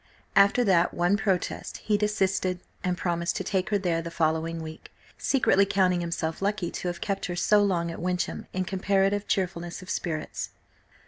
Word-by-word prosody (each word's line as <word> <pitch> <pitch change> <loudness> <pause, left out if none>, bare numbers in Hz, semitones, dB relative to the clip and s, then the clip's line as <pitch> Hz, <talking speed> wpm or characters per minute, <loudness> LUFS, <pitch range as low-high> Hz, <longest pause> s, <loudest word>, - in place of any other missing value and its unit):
After 200 +4 +5
that 180 -5 +3
one 175 +3 +3
protest 195 -4 -1
he 210 - 0
desisted, 190 -3 0 0.2
and 180 -1 0
promised 170 -1 -1
to - - -2
take 190 +1 -1
her 210 - +2
there 175 -4 0
the 170 - -5
following 165 0 0
week, 160 0 -9 0.2
secretly 255 -7 +3
counting 185 -3 +2
himself 165 -1 -3
lucky 200 -3 -1
to - - -4
have 175 -1 -4
kept 195 -1 -2
her 175 - -3
so 205 +4 +4
long 175 -4 +1
at 165 - -7
Wyncham 180 0 -2
in 185 0 -1
comparative 195 +2 +1
cheerfulness 180 -2 -2
of 185 - -6
spirits. 155 -3 -3
185 Hz, 175 wpm, -27 LUFS, 170-195 Hz, 0.2 s, After